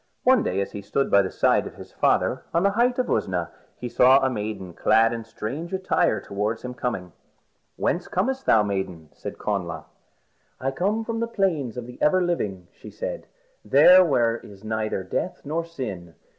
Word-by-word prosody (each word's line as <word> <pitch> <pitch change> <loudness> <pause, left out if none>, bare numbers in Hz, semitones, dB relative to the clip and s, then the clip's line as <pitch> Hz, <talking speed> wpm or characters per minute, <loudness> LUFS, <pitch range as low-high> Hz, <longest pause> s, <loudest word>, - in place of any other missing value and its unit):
One 255 -2 +5
day 95 +2 -1
as 100 - -4
he 105 - -6
stood 105 +7 -1
by 100 - +6
the 95 - -2
side - - +2
of - - -11
his - - -12
father - - +1
on 170 - +3
the 200 - +4
height 240 +4 +2
of 255 - +1
Usna, 90 -3 -1 0.3
he 125 - -5
saw 130 +2 +6
a 135 -1 +1
maiden 105 -5 -5
clad 115 +6 +3
in 115 -1 -4
strange 135 - -6
attire 185 0 +1
coming - - -16
towards 105 +3 -1
him. 125 -7 -4 0.6
"Whence 175 - -1
comest 265 +8 -1
thou, 110 - +5
maiden?" 95 -6 -4
said - - -8
Connla. 85 -6 -3 0.7
"I 135 +1 -1
come 205 +10 0
from 230 0 -3
the 230 - -1
Plains 165 - -1
of 125 - -5
the 125 0 -12
Ever 185 +5 +4
Living," 105 - -2
she - - -13
said, - - -6 0.4
"there 185 +1 +7
where 120 -8 +2
there - - -13
is 100 0 -15
neither 110 -3 -2
death 135 - -3
nor 160 +4 -1
sin. 105 - -7
125 Hz, 190 wpm, -24 LUFS, -, 0.7 s, there